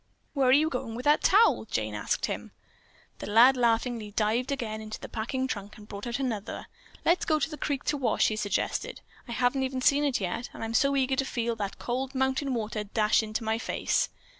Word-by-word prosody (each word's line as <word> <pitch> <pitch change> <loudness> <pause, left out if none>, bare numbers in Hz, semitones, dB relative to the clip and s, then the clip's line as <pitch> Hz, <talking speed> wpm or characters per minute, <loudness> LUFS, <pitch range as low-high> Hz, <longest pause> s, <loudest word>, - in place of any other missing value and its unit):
"Where 275 -3 +2
are - - +6
you 295 +4 +5
going 250 -6 -4
with 245 - -6
that 295 +1 +4
towel?" 420 - +4
Jane 110 - -2
asked 105 - -1
him. - - -5 0.7
The - - -6
lad 235 +6 +6
laughingly 235 -2 +1
dived 220 +5 0
again 220 -5 -3
into 215 0 -7
the - - -8
packing 250 +4 -2
trunk 205 -5 -5
and 210 -1 -13
brought 200 +2 -7
out 240 - -2
another. 235 -7 -3 0.4
"Let's 345 +2 +3
go 310 - +2
to 300 - 0
the - - -4
creek 285 -2 -2
to 295 - 0
wash," 250 -5 +2
he 215 - -2
suggested. 215 - -2 0.3
"I - - -7
haven't 250 +3 +1
even 260 0 -2
seen 285 +3 +4
it 280 -3 +1
yet, 195 +5 -3
and - - -7
I'm 225 - -3
ever - - -3
so 275 +4 +3
eager 265 -1 +1
to 270 - +2
feel 235 -2 -2
that 200 -2 -4
cold 260 +2 -3
mountain 265 0 0
water 215 -1 -3
dash 210 +1 +2
into 220 +1 -4
my 220 +1 0
face." - - 0
240 Hz, 220 wpm, -28 LUFS, 215-270 Hz, 0.7 s, are